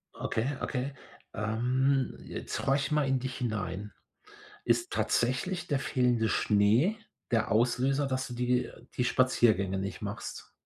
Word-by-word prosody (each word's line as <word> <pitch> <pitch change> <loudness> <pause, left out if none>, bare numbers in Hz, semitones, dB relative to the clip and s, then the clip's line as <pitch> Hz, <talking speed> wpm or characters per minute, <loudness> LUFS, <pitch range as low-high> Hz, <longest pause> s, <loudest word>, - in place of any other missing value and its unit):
Okay, 110 - -1 0.2
okay. 135 +1 -2 0.4
Ähm, 125 +5 +1
jetzt - - -5
horch 135 +1 +1
mal 150 -2 +2
in 135 -1 +2
dich 130 0 -4
hinein. 105 -4 -3 0.7
Ist 350 +1 +1
tatsächlich 160 +9 0
der 145 - +1
fehlende 125 -4 +1
Schnee 110 - +3 0.3
der 115 -2 +1
Auslöser, 125 +5 +2
dass 130 -1 -2
du 125 - -6
die 125 +1 0 0.3
die 125 - +1
Spaziergänge 110 -7 +3
nicht 95 0 -4
machst? 105 -1 -6
125 Hz, 130 wpm, -30 LUFS, 110-135 Hz, 0.7 s, Schnee